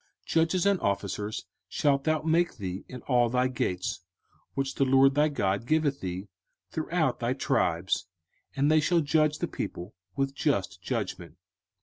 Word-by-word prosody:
05:016:018 - - -44
Judges 165 +3 +2
and 200 -2 +3
officers 100 +1 -2 0.2
shalt 140 -1 +1
thou 155 -1 +1
make 170 +2 +2
thee 95 -2 -5
in 125 -2 -9
all 120 -3 +3
thy 125 +2 +2
gates, 95 -8 -2 0.6
which 135 0 -1
the - - +1
LORD 135 +1 +5
thy 150 +2 +4
God 100 -5 -1
giveth 155 -2 +2
thee, 95 +2 -4 0.4
throughout 160 -3 0
thy 120 +1 0
tribes: 90 -8 0 0.5
and 140 +2 +3
they 155 - +6
shall 170 +3 +3
judge 155 0 +2
the - - -2
people 90 +5 -5 0.2
with 135 0 0
just - - -1
judgment. 85 -1 -4
135 Hz, 155 wpm, -28 LUFS, 105-155 Hz, 0.6 s, they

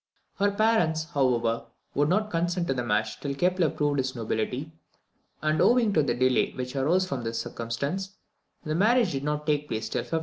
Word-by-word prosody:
Her 205 +1 +4
parents, 200 -7 +2
however, 120 -6 +1 0.3
would 145 +1 +2
not 210 +4 +1
consent 175 +1 0
to - - +1
the 125 - -2
match 110 -2 -1
till 140 -1 -3
Kepler 180 +1 +2
proved 145 -1 0
his 130 0 -1
nobility; 120 +6 -2 0.7
and, 155 0 +2
owing 235 -4 +4
to 155 - +4
the 125 -5 0
delay 130 +1 +2
which 125 +1 -5
arose 165 +8 +2
from 135 -7 -3
this 115 0 -3
circumstance, 140 - -4 0.5
the 155 - -2
marriage 215 +4 +3
did 135 -1 -3
not 150 0 -2
take 150 -1 0
place 110 -3 -3
till - - -1
1597. 165 - -2
150 Hz, 190 wpm, -27 LUFS, 125-180 Hz, 0.7 s, Her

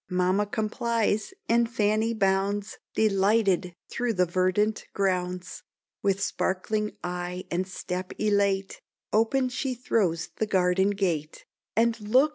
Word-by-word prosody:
Mamma 185 +3 +2
complies, 220 - 0 0.2
and 235 0 +3
Fanny 215 0 +1
bounds 200 -1 0 0.2
Delighted, 195 -3 +2
through 240 -1 -1
the 180 -2 +3
verdant 185 +5 +1
grounds; 180 -1 -1 0.4
With 195 0 +1
sparkling 210 +3 -1
eye 180 +1 -4
and 180 +2 0
step 185 0 -5
elate, 200 -2 +1 0.3
Open 230 +5 +3
she 255 +1 -2
throws 190 -9 0
the 220 - 0
garden 190 0 +3
gate, 175 -7 -2 0.3
"And 230 +1 +2
look!" 255 +8 +4
200 Hz, 115 wpm, -27 LUFS, 185-220 Hz, 0.4 s, look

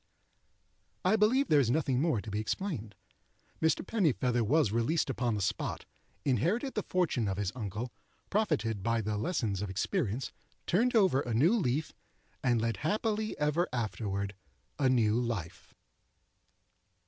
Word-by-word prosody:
I 190 +4 +5
believe 235 +6 +3
there 150 - +6
is 125 -5 +2
nothing 135 -2 +1
more 155 -10 +1
to 110 - -7
be 105 - -1
explained. 110 - -3 0.7
Mr. 160 +3 +2
Pennifeather 130 - +1
was 135 0 +3
released 135 +7 +1
upon 120 -3 -1
the 100 - -1
spot, 95 - -2 0.4
inherited 185 - +1
the 210 - -1
fortune 175 - 0
of 95 -1 -2
his 100 -2 -1
uncle, 110 +1 -5 0.4
profited 150 - 0
by 115 +2 +1
the 105 0 -2
lessons 105 - -1
of 105 - -3
experience, 120 - -1 0.3
turned 235 +7 +2
over 185 - +4
a 120 -5 -2
new 155 - +4
leaf, 155 - 0 0.5
and 120 -2 +3
led 115 -2 -1
happily 215 - -1
ever 150 +4 +1
afterward 105 -4 -2 0.5
a 135 -2 +3
new 115 -3 +3
life. 95 -8 -4
125 Hz, 145 wpm, -31 LUFS, 110-170 Hz, 0.7 s, there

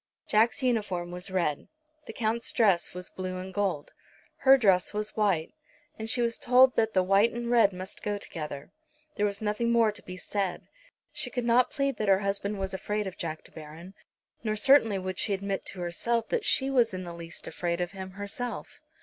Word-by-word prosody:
Jack's 225 +5 +2
uniform 205 -8 -1
was 180 +2 -6
red. 175 -6 -1 0.4
The - - -5
Count's 230 0 -1
dress 195 -7 +2
was 180 0 -6
blue 185 0 -5
and 185 +1 -7
gold. 190 -7 -1 0.5
Her 270 0 +6
dress 195 -5 +2
was 210 0 0
white, 195 -7 +1 0.5
and 220 0 -3
she 240 +1 +3
was 235 0 -1
told 255 +1 +5
that 220 -1 +1
the 185 - +4
white 195 +5 +4
and 240 0 -4
red 230 -4 +5
must 185 +1 -7
go 205 0 -2
together. 150 -7 -7 0.4
There 210 -2 +1
was 200 +1 -4
nothing 215 +3 0
more 230 -2 +4
to 210 - -5
be 185 0 -9
said. 195 -1 -3 0.5
She 250 - -2
could 245 -1 -3
not 240 +1 +4
plead 275 -4 -1
that 215 - -2
her 195 0 +4
husband 200 +1 -1
was 190 0 -3
afraid 210 +2 -2
of 190 -1 -6
Jack 160 -4 -5
De - - -16
Baron. 160 +4 -11 0.5
Nor 215 -2 -1
certainly 225 -2 +5
would 185 -1 -4
she 205 - +1
admit 195 0 -4
to 185 - -6
herself 225 +7 -1
that 460 -3 -1
she 270 0 +2
was 240 -7 +2
in 185 - -5
the 175 -1 -7
least 170 0 -8
afraid 170 -1 -3
of 175 -1 -2
him 190 -1 -8
herself. 205 +5 -5
200 Hz, 200 wpm, -28 LUFS, 185-230 Hz, 0.5 s, Her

